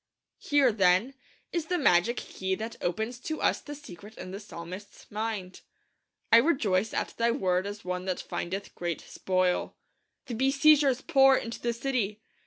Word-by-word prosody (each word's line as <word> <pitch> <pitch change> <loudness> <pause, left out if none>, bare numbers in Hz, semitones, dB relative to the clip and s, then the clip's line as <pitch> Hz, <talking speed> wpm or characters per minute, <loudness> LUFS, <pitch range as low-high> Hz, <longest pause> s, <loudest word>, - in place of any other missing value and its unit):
Here, 285 -4 +3
then, 195 +4 +3 0.4
is 335 -2 -1
the 360 - 0
magic 235 - +3
key 190 0 -3
that 220 +3 -6
opens 220 +8 -2
to 315 +5 -4
us - - +1
the 295 - -8
secret 210 - -12
in 185 - -7
the 195 - -6
psalmist's 190 0 -9
mind. 210 -3 -4 0.7
'I 230 - +9
rejoice 225 - +2
at - - -1
Thy 235 0 +2
Word 190 -6 +1
as 205 -1 -7
one 180 0 -3
that 185 -1 -2
findeth 190 +3 -5
great 175 -2 -3
spoil.' 185 -1 -1 0.5
The 245 - -6
besiegers 275 +2 +4
pour 270 -4 +5
into 230 0 -5
the 240 - 0
city. 235 -4 -2
220 Hz, 160 wpm, -28 LUFS, 185-265 Hz, 0.7 s, I